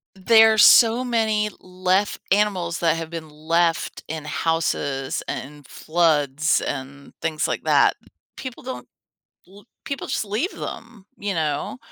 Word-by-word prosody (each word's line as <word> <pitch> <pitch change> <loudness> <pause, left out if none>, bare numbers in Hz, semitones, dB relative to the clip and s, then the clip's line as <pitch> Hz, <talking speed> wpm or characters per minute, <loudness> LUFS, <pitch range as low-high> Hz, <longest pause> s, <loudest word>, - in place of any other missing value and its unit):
There's 220 +2 +6
so 235 +1 +6
many 220 -3 0
left 185 +2 -1
animals 190 -4 +1
that 165 -1 +2
have 165 -1 -5
been 165 -2 -7
left 165 +2 -1
in 155 -1 -6
houses 145 -5 -1
and 145 +1 -7
floods 155 -2 +1
and 140 0 -6
things, 160 -2 -1
like, - - -3
that. - - +4 0.4
People 260 -2 -8
don't 260 0 -7 0.6
l 200 +2 -17 0.2
people 280 - -5
just - - -1
leave 220 - -2
them, 230 -4 -8
you 205 0 -3
know? 160 - -2
175 Hz, 130 wpm, -22 LUFS, 155-215 Hz, 0.6 s, There's